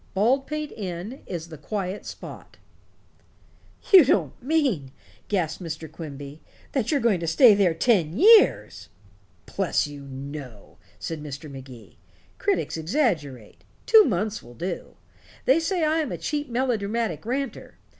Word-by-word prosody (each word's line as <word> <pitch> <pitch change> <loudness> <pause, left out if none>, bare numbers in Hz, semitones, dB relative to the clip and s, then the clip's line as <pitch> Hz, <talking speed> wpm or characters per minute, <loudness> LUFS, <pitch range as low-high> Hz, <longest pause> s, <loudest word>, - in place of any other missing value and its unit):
Baldpate 270 +8 0
Inn 195 +5 -6
is 165 -2 -6
the 160 -3 -10
quiet 195 +3 -4
spot." - - -10 1.4
"You 370 -4 +11
don't 260 - 0
mean," 255 - 0 0.4
gasped 180 -4 -1
Mr. 160 -2 -6
Quimby, 145 -2 -9 0.3
"that 260 -6 -1
you're 290 - +2
going 225 -7 +2
to 165 - -4
stay 220 - +7
there 190 -5 +2
ten 180 -5 +2
years?" 430 - +5 0.6
"Bless - - 0
you, 145 -1 -9
no," 135 -5 -9 0.2
said 160 -2 -5
Mr. 145 0 -8
Magee. 130 -3 -12 0.4
"Critics 400 - 0
exaggerate. 160 - -2 0.2
Two 445 -1 +8
months 215 - -1
will 120 +1 -14
do. 175 +7 -5 0.5
They 270 +5 +5
say 335 +1 -1
I 310 +1 +2
am 310 - -2
a - - -3
cheap 295 -2 -3
melodramatic 230 - -1
ranter. 265 +4 -4
195 Hz, 135 wpm, -25 LUFS, -, 1.4 s, You